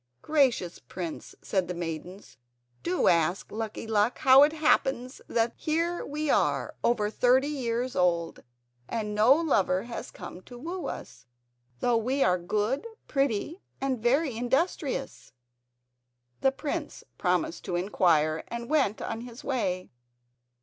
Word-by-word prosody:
"Gracious 265 - +2
prince," 175 -4 -7
said 190 -3 0
the 180 - -4
maidens, 170 0 -6 0.4
"do 175 +7 +1
ask 170 +2 +2
Lucky 220 0 -4
Luck 220 +1 +1
how 265 +1 +7
it 295 +1 +6
happens 265 -5 +1
that 230 0 +1
here 335 +3 -1
we 300 +2 -3
are - - +1
over 215 -3 +2
thirty 255 +4 +3
years 250 -3 -2
old 170 -2 +1 0.5
and 210 -2 -2
no 215 +4 +5
lover 270 - +3
has 235 0 -6
come 180 - -9
to 245 +5 -12
woo 340 +8 -5
us, 125 - -8 0.5
though 240 -1 +3
we 255 +5 +1
are 180 0 +3
good, 215 - -1 0.2
pretty, 275 - -1 0.2
and 265 -4 -1
very 265 +3 +2
industrious." 270 +3 -1 1.1
The 270 - +3
prince 285 +2 -4 0.2
promised 180 -2 0
to 180 - -2
inquire, 165 -4 +2
and 235 +2 -6
went 270 -9 +2
on 225 0 -4
his 240 +1 -10
way. 185 -9 -2
235 Hz, 135 wpm, -28 LUFS, 185-275 Hz, 1.1 s, how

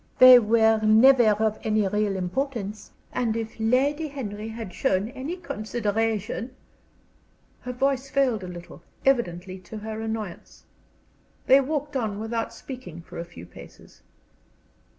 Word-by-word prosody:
They 255 -1 +10
were 220 0 +3
never 235 +5 +6 0.2
of 220 -1 0
any 215 -2 +1
real 210 0 0
importance, 210 +2 -3 0.2
and 230 -2 0
if 225 0 -6
Lady 275 +7 +1
Henry 220 -7 -6
had 225 -4 -7
shown 195 +3 0
any 275 +7 -5
consideration 225 - -2 0.5
" - - -37
Her 250 - -5
voice 270 +1 0
failed 260 -7 +1
her 185 - -7
a - - -7
little, 175 -1 -11 0.2
evidently 185 -8 0
to 185 +4 -10
her 220 +1 -6
annoyance. 220 -5 -6 0.8
They 270 +2 +6
walked 290 +1 -3
on 215 -5 -2
without 225 +1 -3
speaking 240 - -9
for - - -9
a 170 - -4
few 170 - -12
paces. 90 - -15
225 Hz, 140 wpm, -25 LUFS, 210-260 Hz, 0.8 s, They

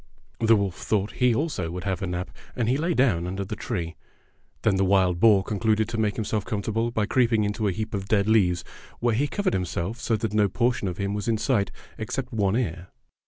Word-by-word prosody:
The 115 0 +5
wolf 100 -3 -1
thought 105 -1 -1
he 125 -2 +2
also 145 - -1
would 90 +1 -5
have 95 -2 -2
a 95 - -2
nap, 90 +1 -4 0.2
and 120 -3 0
he 125 - +3
lay 165 +4 0
down 100 -10 +2
under 95 +2 -3
the 105 - -5
tree. 85 -7 -4 0.7
Then 100 -3 +3
the 95 - +2
wild 95 -2 +3
boar 105 -2 +6
concluded 110 +1 +1
to 115 - -3
make 105 -2 +1
himself 110 -2 -1
comfortable 110 +2 -1
by 110 -3 0
creeping 115 -2 +2
into 105 +1 -1
a - - +2
heap 110 +5 -4
of 100 -1 -3
dead 100 -1 +2
leaves, 95 -6 +3 0.4
where 120 -1 +2
he 135 +7 +1
covered 205 +5 -1
himself 90 +4 -2
so 115 - 0
that 110 0 -2
no 105 -1 +3
portion 120 0 0
of 90 -1 -4
him 100 0 -2
was 105 -1 -3
in 115 -1 +2
sight 110 -3 +1 0.3
except - - -4
one 100 -2 +1
ear. 90 -7 -3
105 Hz, 220 wpm, -25 LUFS, 95-115 Hz, 0.7 s, boar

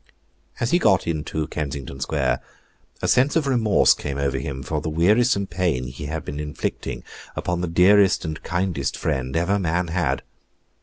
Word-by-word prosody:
As 120 - 0
he 175 - +4
got 100 - +3
into 80 -1 -2
Kensington 70 -3 -5
Square, 65 - 0 0.6
a - - +2
sense 130 +5 +3
of 160 -3 +2
remorse 120 -6 +4
came 70 -1 -5
over 70 -1 0
him 65 -1 -5
for 75 +3 -2
the 80 - -3
wearisome 100 +7 +3
pain 85 -7 -1
he 65 +4 -7
had 80 +1 -4
been 75 0 -5
inflicting 75 -1 -4 0.3
upon 90 -1 -2
the 90 - -1
dearest 95 +3 +4
and 80 -1 -4
kindest 90 -6 -1
friend 65 -4 -2
ever 95 +5 +1
man 85 -1 0
had. 90 0 0
85 Hz, 165 wpm, -23 LUFS, 75-95 Hz, 0.6 s, he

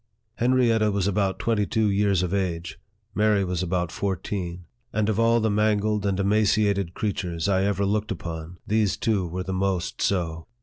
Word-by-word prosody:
Henrietta 120 -3 +3
was 100 -2 0
about 100 -1 0
twenty 105 -3 0
two 110 -2 +1
years 100 -2 +2
of 90 +1 -2
age, 85 -4 -2 0.3
Mary 105 -1 +3
was 90 -2 -2
about 90 -1 -1
fourteen; 90 -2 -3 0.3
and 105 -1 0
of 110 0 0
all 115 0 +4
the 110 -1 +1
mangled 105 0 +1
and 95 -1 0
emaciated 100 -2 +2
creatures 90 -5 -2
I 95 -1 +2
ever 100 0 0
looked 105 +1 0
upon, 85 -3 -6
these 105 -2 +1
two 100 -6 0
were 90 +2 -4
the 95 - -4
most 95 -2 -1
so. 85 -4 -1
100 Hz, 170 wpm, -25 LUFS, 90-105 Hz, 0.3 s, all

